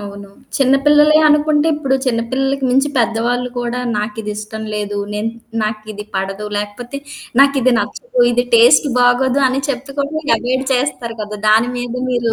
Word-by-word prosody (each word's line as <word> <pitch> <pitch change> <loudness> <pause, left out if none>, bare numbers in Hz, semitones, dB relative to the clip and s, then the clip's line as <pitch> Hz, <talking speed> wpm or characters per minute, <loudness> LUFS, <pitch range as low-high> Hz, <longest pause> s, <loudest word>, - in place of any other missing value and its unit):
అవును. 200 0 -9 0.3
చిన్న 270 -1 +3
పిల్లలేనుకుంటే, 300 0 +4
ఇప్పుడు 275 -3 -1
చిన్న 230 -2 +1
పిల్లలకి 270 +1 -1
మించి 270 +3 +2
పెద్దవాళ్ళు 240 +2 0
కూడా 240 +1 -3 0.2
నాకిది 210 0 -4
ఇష్టం 215 +1 -7
లేదు. 205 -1 -3 0.2
నేను 215 +2 -2 0.3
నాకిది 215 -1 -5
పడదు. 195 +2 -3
లేకపోతే, 235 +6 -5 0.4
నాకిది 275 -2 +4
నచ్చదు. 245 - -3
ఇది 245 +1 +1
టేస్ట్ 235 +5 +6
బాగోదు 250 +2 +3
అని 265 +2 -1
చెప్త 270 0 -4
కూడా 280 +2 -1 0.3
అవాయిడ్ 255 +2 -2
చేస్తారు 245 -3 -2
కదా! 210 0 -7
దాని 225 +3 +4
మీద 245 -1 -4 0.2
మీరు 240 -2 0
245 Hz, 145 wpm, -17 LUFS, 215-270 Hz, 0.4 s, టేస్ట్